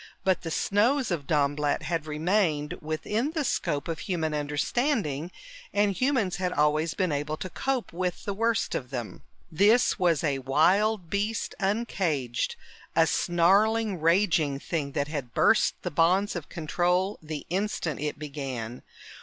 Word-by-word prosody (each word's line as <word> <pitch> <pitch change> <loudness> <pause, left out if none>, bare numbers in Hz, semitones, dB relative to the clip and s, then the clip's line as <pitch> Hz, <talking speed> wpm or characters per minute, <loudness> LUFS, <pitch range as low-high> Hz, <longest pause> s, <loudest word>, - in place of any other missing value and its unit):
But 190 -1 +2
the 165 - -5
snows 225 - +1
of 150 -6 -2
Dornblatt 145 -1 +1
had 165 -2 -2
remained 155 -1 0
within 210 - -2
the 315 -3 0
scope 145 - -1
of 165 -1 -3
human 160 -5 -2
understanding, 150 - -1 0.4
and 205 0 +3
humans 230 -4 0
had 180 -1 -1
always 150 +1 +1
been 185 -4 0
able 150 +1 -2
to 185 - -6
cope 265 -2 -2
with 180 0 -3
the 200 - -2
worst 230 +2 0
of 125 - -3
them. 120 -8 -6 0.3
This 210 +8 +4
was 170 -4 +2
a 140 -4 0
wild 175 +8 +2
beast 210 +3 -1
uncaged, 190 - -1 0.4
a - - +5
snarling, 200 +4 +2
raging 165 -5 +2
thing 145 -3 -3
that 145 - -1
had 140 -6 -5
burst 220 - +4
the 180 - -3
bonds 180 +6 +2
of 170 -4 -6
control 180 +4 0
the 155 -2 -6
instant 185 -6 -1
it 150 0 -3
began. 135 -6 -5
170 Hz, 145 wpm, -27 LUFS, 150-205 Hz, 0.4 s, a